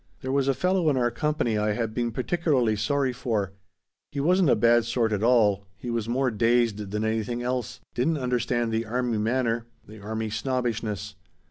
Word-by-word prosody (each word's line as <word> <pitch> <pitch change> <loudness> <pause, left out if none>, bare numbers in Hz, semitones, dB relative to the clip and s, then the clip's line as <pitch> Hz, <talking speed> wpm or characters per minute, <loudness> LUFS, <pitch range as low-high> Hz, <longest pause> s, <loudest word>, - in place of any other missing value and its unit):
"There 130 -1 -3
was 135 0 +1
a 135 - +2
fellow 180 -1 +2
in 140 - +1
our 120 -1 +2
company 120 -4 0
I 105 0 +1
had 115 -1 -2
been 120 0 -1
particularly 130 -3 +1
sorry 130 +5 0
for. 110 -6 -2 0.6
He 145 - -4
wasn't 180 +3 +3
a - - +5
bad 120 0 +4
sort 115 -2 0
at 105 - -1
all; 105 -4 +3
he 120 - -5
was 115 -1 -2
more 130 +1 +1
dazed 115 -2 +1
than 105 +2 -2
anything 110 +2 -1
else; 125 -2 -3
didn't 155 +6 +1
understand 120 -2 0
the 110 0 -1
army 120 -1 -1
manner; 115 0 0 0.2
the 110 +1 -12
army 110 +1 -3
snobbishness. 110 -5 -2
120 Hz, 185 wpm, -26 LUFS, 110-130 Hz, 0.6 s, a